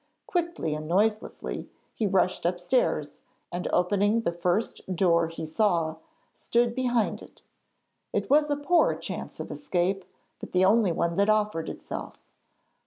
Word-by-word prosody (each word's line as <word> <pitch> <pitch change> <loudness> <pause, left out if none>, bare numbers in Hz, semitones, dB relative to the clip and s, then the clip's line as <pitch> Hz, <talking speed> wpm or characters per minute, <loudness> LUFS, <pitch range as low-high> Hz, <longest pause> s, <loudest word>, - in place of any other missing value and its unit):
Quickly 340 - -1
and 155 0 -5
noiselessly 210 +5 -1 0.2
he 215 - 0
rushed 185 -1 +1
upstairs, 175 - 0 0.3
and 175 +1 -3
opening 205 +5 +2
the 195 - 0
first 180 +2 -1
door 170 -2 +3
he 165 0 -6
saw, 165 -2 +1 0.4
stood 235 0 +1
behind 245 -3 0
it. - - -15 0.7
It - - -1
was 300 +1 +4
a 290 - +1
poor 330 +4 +3
chance - - -6
of - - -5
escape, 190 -7 -1 0.4
but - - -9
the 185 +1 +4
only 210 -1 +4
one 170 0 -1
that 200 +1 +3
offered 210 -6 +1
itself. - - -7
195 Hz, 140 wpm, -27 LUFS, 170-230 Hz, 0.7 s, was